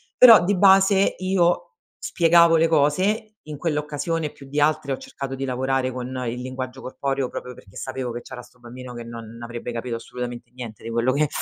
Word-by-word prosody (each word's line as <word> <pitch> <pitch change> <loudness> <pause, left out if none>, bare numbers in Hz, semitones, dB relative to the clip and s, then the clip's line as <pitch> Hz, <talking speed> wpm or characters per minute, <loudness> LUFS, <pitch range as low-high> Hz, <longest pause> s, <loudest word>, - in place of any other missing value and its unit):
Però, 230 -7 +9
di 200 +1 +2
base, 195 +1 +5
io 185 - +1 0.3
spiegavo 170 -1 +4
le 165 +1 +4
cose, 190 +9 +1
in 150 -1 -6
quell'occasione 150 +1 -2
più 140 - -14
di 145 +2 -1
altre, 150 -2 +1
ho 135 - -1
cercato 135 -1 -7
di 135 0 -4
lavorare 130 0 -1
con 125 -1 -5 0.2
il 120 +2 -4
linguaggio 130 0 -6
corporeo, 135 0 -3
proprio 125 -1 -7
perché 95 - -17
sapevo 130 -2 -4
che 120 +1 -6
c'era 125 - -10
sto 125 - -21
bambino 125 +1 -10
che 120 -1 -7
non 115 -1 -9
avrebbe 120 +1 -6
capito 115 0 -4
assolutamente 120 +1 -7
niente 115 -4 -9
di 115 - -6
quello 120 +3 +1
che 150 +2 +2
135 Hz, 190 wpm, -23 LUFS, 125-165 Hz, 0.3 s, Però